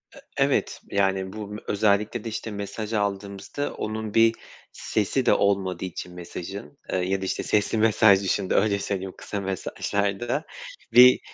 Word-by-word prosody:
E - - -12 0.2
evet. - - +1
Yani 95 -1 +1
bu 105 -1 -6
m 105 +1 -7
özellikle 105 +2 +1
de, 115 - -4
işte, 110 0 -5
mesaj 105 +2 -5
aldığımızda 100 +6 -2
onun 110 -1 -4
bir 115 0 +5 0.4
sesi 110 +5 -1
de - - +5
olmadığı 95 -3 +1
için 90 0 -7
mesajın, 90 -1 -8 0.2
ııı, 90 -1 +1
ya 95 +1 -1
da, - - -2
işte, - - -2
sesli 105 +1 +1
mesaj 110 -2 +5
dışında 95 0 0
öyle 100 -1 +3
söyleyeyim 95 -2 -3
kısa 100 - -5
mesajlarda 100 - -2 0.5
bir 125 +1 +9
100 Hz, 155 wpm, -25 LUFS, 95-110 Hz, 0.5 s, bir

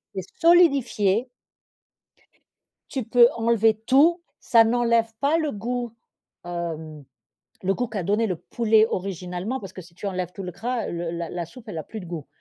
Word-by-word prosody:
est 190 - -5
solidifié 265 - +4 1.6
tu 265 -4 -3
peux 240 +1 +6
enlever 225 -1 +3
tout, 325 +7 +4 0.2
ça 230 -1 +5
n'enlève 230 -1 +2
pas 290 +4 +2
le 310 -3 -1
goût. 240 +2 -4 0.5
Hem, 160 -4 -5 0.6
le 195 +1 +1
goût 245 -2 -2
qu'a 205 -5 -3
donné 210 +5 +1
le 180 -4 -2
poulet 220 +3 +2
originalement 185 +5 -4
parce 190 -2 -9
que 185 - -8
si 170 0 -18
tu 200 - -7
enlèves 180 -2 -3
tout 195 - -7
le 180 - -5
gras, 235 +5 -3
le 170 -1 -4
la 170 -1 -4
la 175 -2 -4
soupe 230 +5 -14
elle 165 - -5
a - - -4
plus 220 +6 -8
de 180 - -9
goût. 165 -4 -6
215 Hz, 175 wpm, -24 LUFS, 180-240 Hz, 1.6 s, peux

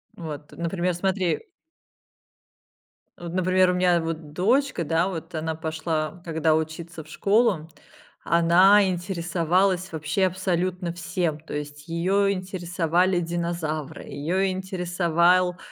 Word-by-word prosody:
Вот, 155 -3 -7
например, 175 +1 -1
смотри 185 0 0 1.8
вот, 170 -1 -7
например, 185 0 +3
у - - -1
меня 180 -1 +3
вот 160 -2 -5
дочка, 240 - +1
да. 165 +3 +1
Вот 165 -2 -6
она 160 0 -2
пошла, 160 0 -3
когда 160 -1 +2
учиться 160 +1 -4
в - - -20
школу, 195 0 +2 0.5
она 185 +4 +5
интересовалась 180 +1 0
вообще 160 +4 0
абсолютно 180 -1 -2
всем. 170 -2 -2
То 155 - -10
есть 145 +1 -7
ее 195 +4 +1
интересовали 180 -1 0
динозавры, 170 -3 -3
ее 185 +6 -1
интересовал 180 -1 +1
175 Hz, 110 wpm, -25 LUFS, 160-185 Hz, 1.8 s, она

